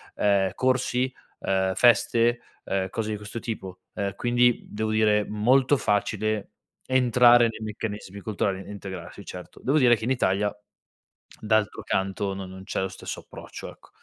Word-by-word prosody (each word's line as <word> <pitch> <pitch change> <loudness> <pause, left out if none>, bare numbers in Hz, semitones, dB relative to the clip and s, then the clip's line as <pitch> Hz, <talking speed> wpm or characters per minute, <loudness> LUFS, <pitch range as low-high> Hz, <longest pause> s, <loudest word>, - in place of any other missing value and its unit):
ehm, 100 -2 +2
corsi, 130 0 +1 0.3
uhm, 95 -1 0
feste, 120 +1 +4 0.3
uhm, 95 -1 -1
cose 110 +1 -3
di 105 - -2
questo 105 +3 -6
tipo. 95 -6 -6 0.2
Ehm, 100 -2 -2
quindi 120 0 +2
devo 110 +1 -2
dire 105 -1 +3
molto 125 +6 +3
facile 105 -1 0 0.4
entrare 120 -2 +5
nei 110 - -9
meccanismi 105 -2 -5
culturali 95 -2 -2
e - - -10
integrarsi, 95 -1 -8
certo. 90 -1 -10
Devo 140 +4 +2
dire 125 -5 +6
che 110 - -9
in 125 - 0
Italia, 105 -4 +1 0.9
d'altro 110 0 0
canto, 95 0 -1
non 95 -1 -6
non 95 0 -10
c'è 95 - -3
lo 95 - 0
stesso 95 - -7
approccio, - - -10
ecco. - - -20
105 Hz, 155 wpm, -26 LUFS, 95-120 Hz, 0.9 s, dire